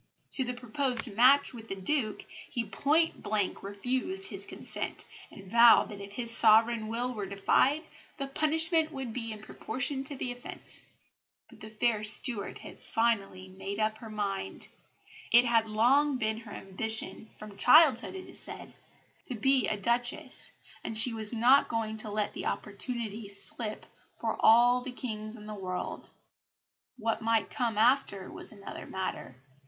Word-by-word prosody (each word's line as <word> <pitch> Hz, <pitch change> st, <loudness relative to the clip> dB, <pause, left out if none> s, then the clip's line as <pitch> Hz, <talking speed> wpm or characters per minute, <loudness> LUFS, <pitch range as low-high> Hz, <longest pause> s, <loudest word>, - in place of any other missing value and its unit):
To 265 Hz, -, +2 dB
the 250 Hz, 0 st, -4 dB
proposed 245 Hz, -2 st, 0 dB
match 265 Hz, +5 st, +5 dB
with 225 Hz, -2 st, -10 dB
the 195 Hz, -, -4 dB
Duke 215 Hz, +3 st, -1 dB, 0.2 s
he 240 Hz, -, -2 dB
point 305 Hz, +10 st, 0 dB
blank 205 Hz, -2 st, -2 dB
refused 260 Hz, -, 0 dB
his -, -, -3 dB
consent, -, -, -3 dB, 0.2 s
and 195 Hz, -, -13 dB
vowed 230 Hz, +4 st, +5 dB
that 205 Hz, -2 st, -9 dB
if 200 Hz, 0 st, -10 dB
his 230 Hz, +1 st, +6 dB
sovereign 225 Hz, 0 st, +5 dB
will 240 Hz, +3 st, -3 dB
were 205 Hz, -4 st, -5 dB
defied, 255 Hz, -, +1 dB, 0.3 s
the 275 Hz, -, -2 dB
punishment 320 Hz, +3 st, +1 dB
would 265 Hz, -5 st, -6 dB
be 230 Hz, -2 st, -4 dB
in 215 Hz, -1 st, -8 dB
proportion 265 Hz, +4 st, -2 dB
to 280 Hz, -, -6 dB
the 255 Hz, -1 st, -4 dB
offence. 245 Hz, 0 st, -9 dB, 0.6 s
But -, -, -17 dB
the 215 Hz, -, -9 dB
fair 220 Hz, 0 st, -1 dB
Stuart 215 Hz, 0 st, +1 dB
had -, -, -12 dB
finally 200 Hz, -5 st, -1 dB
made 195 Hz, +2 st, -7 dB
up 215 Hz, 0 st, -1 dB
her 225 Hz, -, -10 dB
mind. 205 Hz, -2 st, -5 dB, 0.6 s
It 240 Hz, +1 st, +6 dB
had 230 Hz, -2 st, +2 dB
long 260 Hz, +6 st, +2 dB
been 220 Hz, -2 st, -2 dB
her 225 Hz, -2 st, -13 dB
ambition 220 Hz, +3 st, -4 dB
from 210 Hz, -1 st, -11 dB
childhood, 295 Hz, -, +5 dB
it 375 Hz, -, -9 dB
is -, -, -4 dB
said -, -, -6 dB, 0.5 s
to 250 Hz, -, -5 dB
be 265 Hz, +3 st, +2 dB
a 210 Hz, -, -1 dB
Duchess, 235 Hz, +3 st, -1 dB, 0.3 s
and 220 Hz, -, -2 dB
she 230 Hz, +2 st, +9 dB
was 220 Hz, -2 st, -2 dB
not 250 Hz, +5 st, +5 dB
going 220 Hz, -1 st, -3 dB
to 215 Hz, 0 st, -2 dB
let 210 Hz, 0 st, -2 dB
the -, -, -5 dB
opportunity 220 Hz, 0 st, -3 dB
slip 210 Hz, +2 st, -4 dB, 0.3 s
for -, -, -3 dB
all 245 Hz, +2 st, +5 dB
the 260 Hz, 0 st, -6 dB
kings 215 Hz, -3 st, -6 dB
in 210 Hz, -2 st, -12 dB
the 215 Hz, -, -7 dB
world. 185 Hz, -3 st, -6 dB, 0.9 s
What 225 Hz, -1 st, -2 dB
might 225 Hz, 0 st, 0 dB
come 230 Hz, -4 st, -2 dB
after 220 Hz, -5 st, +2 dB
was -, -, -6 dB
another 200 Hz, -2 st, -10 dB
matter. 190 Hz, -8 st, -5 dB
225 Hz, 160 wpm, -29 LUFS, 215-250 Hz, 0.9 s, she